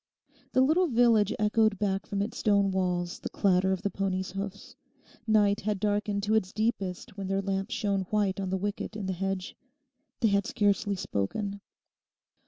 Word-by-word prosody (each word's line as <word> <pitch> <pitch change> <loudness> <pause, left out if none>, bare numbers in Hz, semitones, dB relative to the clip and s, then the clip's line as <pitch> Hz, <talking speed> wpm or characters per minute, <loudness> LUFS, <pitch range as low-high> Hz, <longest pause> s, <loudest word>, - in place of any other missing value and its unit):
The 260 - +4
little 320 +7 +4
village 230 - +4
echoed 215 0 +2
back 195 -1 -1
from 200 0 -1
its 210 - -5
stone 200 -2 +3
walls 180 -2 -1
the - - -5
clatter 190 -1 +2
of 190 0 -2
the 200 - 0
pony's 190 -1 -2
hoofs. 195 +1 -6 0.5
Night 210 -1 +3
had 210 -1 -1
darkened 205 0 0
to 210 +1 +1
its 190 -4 +1
deepest 215 -2 -2
when 195 -1 -4
their 195 +1 0
lamp 195 +1 -2
shone 200 -5 -1
white 205 -2 +1
on 190 -1 -2
the 190 - 0
wicket 205 +2 -4
in 210 -2 -4
the 190 - -1
hedge. 195 0 -3 0.7
They 225 - +4
had 200 0 +1
scarcely 205 0 +1
spoken. 195 - -3
200 Hz, 175 wpm, -29 LUFS, 190-210 Hz, 0.7 s, The